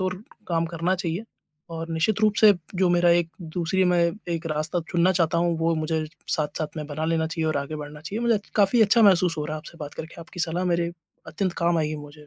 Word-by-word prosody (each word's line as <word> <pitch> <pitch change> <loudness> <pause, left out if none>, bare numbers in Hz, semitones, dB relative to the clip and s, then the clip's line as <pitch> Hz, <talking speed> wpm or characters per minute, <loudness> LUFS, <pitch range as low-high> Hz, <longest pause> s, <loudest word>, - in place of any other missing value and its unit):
ओर 185 0 -1 0.3
काम 165 -1 +1
करना 170 +2 -1
चाहिए 180 +2 -3 0.5
और 165 0 -5
निश्चित 175 +7 +1
रूप 215 -1 +3
से 215 -1 +8 0.2
जो 185 0 +2
मेरा 175 0 +4
एक 170 -1 +3 0.3
दूसरी 180 +2 +1
मैं 180 -1 +3 0.3
एक 165 0 -4
रास्ता 155 +3 -1
चुनना 175 +1 +3
चाहता 170 -2 +1
हूँ, 170 0 +1
वो 165 0 +1
मुझे 155 0 -1 0.2
साथ-साथ 150 +1 -1
में 150 -1 -4
बना 155 +1 -4
लेना 160 0 +1
चाहिए 165 -1 -2
और 155 - 0
आगे 140 +2 -3
बढ़ना 150 0 -8
चाहिए। 195 +8 -5
मुझे 235 -1 +3
अच 205 -1 -4
काफ़ी 210 +3 +4
अच्छा 220 +2 +4
महसूस 185 -4 +5
हो 150 - -1
रहा 155 +1 -3
है - - -5
आपसे 165 +2 -12
बात 145 -1 -6
करके, 160 +1 -8
आपकी 175 +2 -8
सलाह 175 +1 -1
मेरे 170 -1 +1 0.4
अत्यंत 185 +2 -2
काम 170 0 +2
आएगी 155 -1 -1
मुझे 150 0 -12
170 Hz, 230 wpm, -25 LUFS, 155-180 Hz, 0.5 s, से